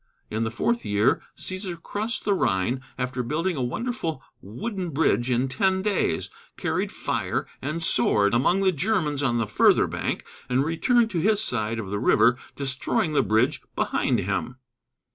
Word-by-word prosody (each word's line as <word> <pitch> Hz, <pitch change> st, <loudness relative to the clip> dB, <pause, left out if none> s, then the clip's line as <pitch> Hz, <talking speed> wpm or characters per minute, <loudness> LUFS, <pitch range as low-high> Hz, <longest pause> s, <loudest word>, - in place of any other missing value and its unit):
In 110 Hz, -, -1 dB
the 110 Hz, -, -1 dB
fourth 235 Hz, -, -1 dB
year 105 Hz, +3 st, +2 dB, 0.2 s
Cæsar 185 Hz, -2 st, -5 dB
crossed 215 Hz, +7 st, -4 dB
the 205 Hz, -, +3 dB
Rhine, 120 Hz, -, 0 dB, 0.2 s
after 125 Hz, 0 st, -2 dB
building 160 Hz, +9 st, -1 dB
a 135 Hz, -, -2 dB
wonderful 165 Hz, -, -3 dB, 0.2 s
wooden 185 Hz, -, -4 dB
bridge 130 Hz, -6 st, +1 dB
in 125 Hz, +1 st, +1 dB
ten 190 Hz, +5 st, +1 dB
days, 195 Hz, -, 0 dB, 0.3 s
carried -, -, -1 dB
fire -, -, -2 dB, 0.2 s
and 155 Hz, +5 st, -3 dB
sword 105 Hz, -7 st, +3 dB
among 155 Hz, +11 st, +3 dB
the 190 Hz, -1 st, +4 dB
Germans 160 Hz, -4 st, 0 dB
on 120 Hz, -4 st, +1 dB
the 115 Hz, -, +1 dB
further 105 Hz, -, +4 dB
bank, -, -, -3 dB, 0.2 s
and 130 Hz, +3 st, +2 dB
returned 225 Hz, +8 st, +2 dB
to 175 Hz, -, -1 dB
his 210 Hz, +4 st, +3 dB
side 115 Hz, -, 0 dB
of 105 Hz, -4 st, -5 dB
the 105 Hz, -, -1 dB
river, 120 Hz, +3 st, +4 dB, 0.2 s
destroying 140 Hz, +3 st, 0 dB
the 145 Hz, -, +4 dB
bridge 110 Hz, -1 st, +1 dB
behind -, -, +1 dB
him. 125 Hz, -, -2 dB
140 Hz, 160 wpm, -25 LUFS, 120-190 Hz, 0.3 s, the